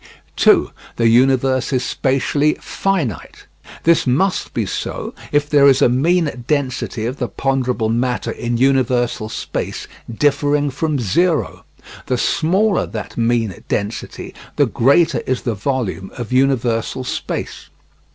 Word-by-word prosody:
2. - - +4 0.2
The 115 - +2
universe 130 +2 +3
is 130 -2 0
spatially 140 +3 +1
finite. 170 - -3 0.4
This 165 -4 +3
must 175 +10 +1
be - - -1
so, - - -4 0.2
if 145 0 +2
there 145 -1 +5
is 135 -1 +5
a - - +4
mean 145 0 +1
density 130 -6 -1
of 125 +4 -3
the 125 - -2
ponderable 130 -4 -1
matter 125 +2 -1
in 120 0 -3
universal 125 -3 +1
space 110 - -5 0.2
differing 145 +3 +1
from 150 +2 -1
zero. 155 - 0 0.4
The 125 - 0
smaller 190 - +1
that 110 -2 -7
mean 115 -5 0
density, 105 +1 -4 0.2
the - - +3
greater 140 +7 +3
is 130 -1 -1
the 120 - -1
volume 105 -3 -3
of 120 0 -5
universal 130 -2 +1
space. - - -5
130 Hz, 130 wpm, -18 LUFS, 120-145 Hz, 0.4 s, there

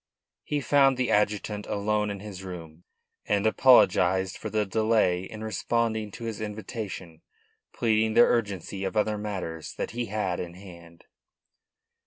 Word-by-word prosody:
He 145 -1 -2
found 135 -1 +4
the 130 -1 0
adjutant 105 0 0
alone 105 +1 0
in 100 -1 -5
his 100 -3 -8
room, 85 -2 -9 0.4
and 100 0 +1
apologised 95 -6 +4
for - - -6
the 105 -1 0
delay 105 -3 +2
in 110 +2 -8
responding 110 0 -1
to 120 - -8
his 115 -2 -4
invitation, 105 -6 -6 0.5
pleading 110 -1 +1
the - - +8
urgency 100 -5 +1
of 95 +3 -3
other 105 0 +1
matters 95 -6 -5
that - - -4
he 120 +1 -3
had 95 -4 -2
in 85 -1 -6
hand. 85 -3 -14
105 Hz, 145 wpm, -27 LUFS, 95-110 Hz, 0.5 s, the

